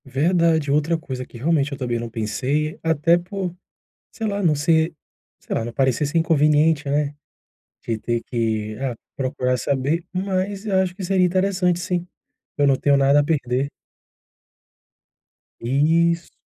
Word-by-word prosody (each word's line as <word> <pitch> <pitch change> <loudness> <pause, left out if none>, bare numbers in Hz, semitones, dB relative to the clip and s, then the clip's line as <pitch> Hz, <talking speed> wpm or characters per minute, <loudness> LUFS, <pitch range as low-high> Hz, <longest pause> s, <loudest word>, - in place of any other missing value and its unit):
Verdade, 160 +2 +2
outra 150 +3 +2
coisa 130 -5 -6
que 125 - -13
realmente 145 +2 +1
eu 140 - -5
também 120 -2 -2
não 120 0 -5
pensei, 130 +8 -2
até 165 +1 +3
por, 180 0 -5 0.6
sei 225 - -4
lá, 200 -1 -1
não 165 -4 +3
ser, 160 +2 +2 0.5
sei - - -6
lá, 115 - -1
não 120 - -5
parecer 130 +3 +1
ser 160 +4 0
inconveniente, 155 -2 +3
né? 145 0 0 0.7
De 115 -1 -2
ter 120 +1 -2
que, 110 -3 -2
ah, 130 -3 -2 0.2
procurar 130 -1 -1
saber, 140 +7 0
mas 190 +2 -2
acho 190 -2 +1
que 195 - -7
seria 185 0 +2
interessante 185 -1 +1
sim. 175 0 -2 0.5
Eu 145 - +3
não 135 -1 +4
tenho 140 +1 +3
nada 140 +1 +4
a - - +3
perder. 140 -3 0 1.9
Isso. 165 +7 +2
150 Hz, 150 wpm, -22 LUFS, 130-170 Hz, 1.9 s, não